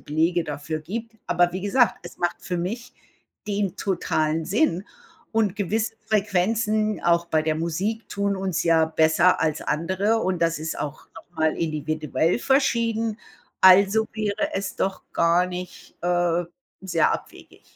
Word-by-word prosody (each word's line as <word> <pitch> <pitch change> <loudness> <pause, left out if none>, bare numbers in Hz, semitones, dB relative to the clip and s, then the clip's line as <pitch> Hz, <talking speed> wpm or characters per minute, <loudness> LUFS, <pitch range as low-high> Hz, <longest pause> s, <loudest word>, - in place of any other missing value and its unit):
Belege 165 +3 0
dafür 150 +1 -4
gibt. 225 +7 -6
Aber 175 0 +2
wie 185 - -4
gesagt, 230 +5 +3
es - - -10
macht 175 0 0
für 180 - -3
mich 230 +8 -4 0.5
den 200 -2 -1
totalen 160 -4 0
Sinn, 200 - +1 0.5
und 220 -3 +1
gewisse 220 +3 -1
Frequenzen 215 0 +1
auch 170 0 +3
bei 155 -2 +1
der 155 0 0
Musik 185 +8 -2
tun 200 0 -1
uns 190 -3 -2
ja 165 -1 +4
besser 160 +3 +3
als 155 -2 0
andere, 190 +8 0
und 185 -4 -1
das 165 -1 +1
ist 160 +1 -4
auch 150 +1 -5
noch 165 - -13
mal 160 0 +1
individuell 155 +2 -1
verschieden. 230 -5 +1 0.4
Also, 200 +4 +6
wäre 215 -1 -2
es 195 -1 -3
doch 190 0 -2
gar 170 +2 +3
nicht, 180 0 -8
äh, 175 -1 +1 0.4
sehr 175 -4 +2
abwegig. - - -8
180 Hz, 145 wpm, -24 LUFS, 165-210 Hz, 0.5 s, Also